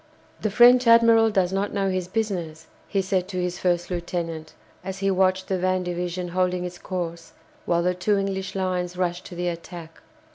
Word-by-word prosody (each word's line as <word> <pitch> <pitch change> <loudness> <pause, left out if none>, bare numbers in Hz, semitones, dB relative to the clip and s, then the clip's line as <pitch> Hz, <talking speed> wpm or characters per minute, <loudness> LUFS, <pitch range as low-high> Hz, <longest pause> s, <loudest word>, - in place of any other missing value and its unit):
"The 215 - 0
French 245 +3 +6
admiral 230 -1 +6
does 190 -3 +1
not 200 +2 -1
know 195 -1 +1
his 185 -1 -2
business," 185 -6 -3 0.2
he 195 -2 0
said 185 -1 0
to 190 -2 -6
his 180 0 -2
first 175 0 0
lieutenant, 170 -2 -4 0.3
as 190 0 -5
he 195 0 0
watched 185 0 +1
the 190 -1 -1
van 185 0 +1
division 180 0 -3
holding 180 0 0
its 180 0 -7
course, 170 -3 -5 0.3
while 170 0 +2
the 180 +1 +2
two 185 +3 +1
English 195 -1 -3
lines 180 -2 -2
rushed 175 -1 -2
to 175 - -9
the 175 +1 -2
attack. 170 -1 -7
185 Hz, 185 wpm, -24 LUFS, 175-195 Hz, 0.3 s, French